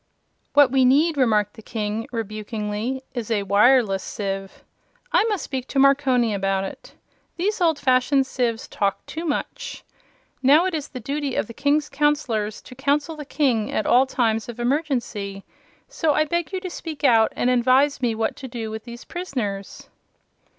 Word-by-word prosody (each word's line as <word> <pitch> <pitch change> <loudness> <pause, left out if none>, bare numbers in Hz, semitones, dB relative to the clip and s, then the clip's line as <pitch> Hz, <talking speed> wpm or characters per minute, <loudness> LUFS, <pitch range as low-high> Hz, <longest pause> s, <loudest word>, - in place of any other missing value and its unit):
"What 285 -3 +6
we 265 -1 +4
need," 295 +6 +4
remarked 215 -6 +2
the 220 - -13
King, 215 0 -3
rebukingly, 215 +2 -4
"is 240 -4 -4
a 210 -3 +1
wireless 205 0 +4
sieve. 195 -1 -5 0.5
I - - +4
must 415 -6 -1
speak 260 -2 -4
to - - -5
Marconi 270 -4 +4
about 195 -1 0
it. 195 - -9 0.4
These 395 +3 -1
old 325 -3 +3
fashioned 265 0 +2
sieves 240 -4 -2
talk 200 -1 -2
too 325 +2 -6
much. 295 - -4 0.6
Now, 290 +6 +5
it 375 - -1
is 305 -3 -3
the 255 - -8
duty 280 +2 -3
of - - 0
the 230 - -10
King's 290 +3 +1
Counselors 275 -8 0
to - - -12
counsel 285 +4 0
the 300 -1 -8
King 250 -8 0
at 215 - -1
all 260 +2 +4
times 225 -3 0
of 240 0 -8
emergency, 240 -7 -2 0.4
so 325 -12 0
I 310 - +3
beg 340 +2 -2
you 380 - -2
to 370 - -5
speak 320 -4 -7
out 225 -5 +5
and 250 - +1
advise 260 +3 +3
me 235 -3 +1
what 220 0 -1
to 265 - -7
do 230 -3 -5
with 220 0 -7
these 235 0 -10
prisoners." 230 - -5
255 Hz, 170 wpm, -23 LUFS, 220-290 Hz, 0.6 s, What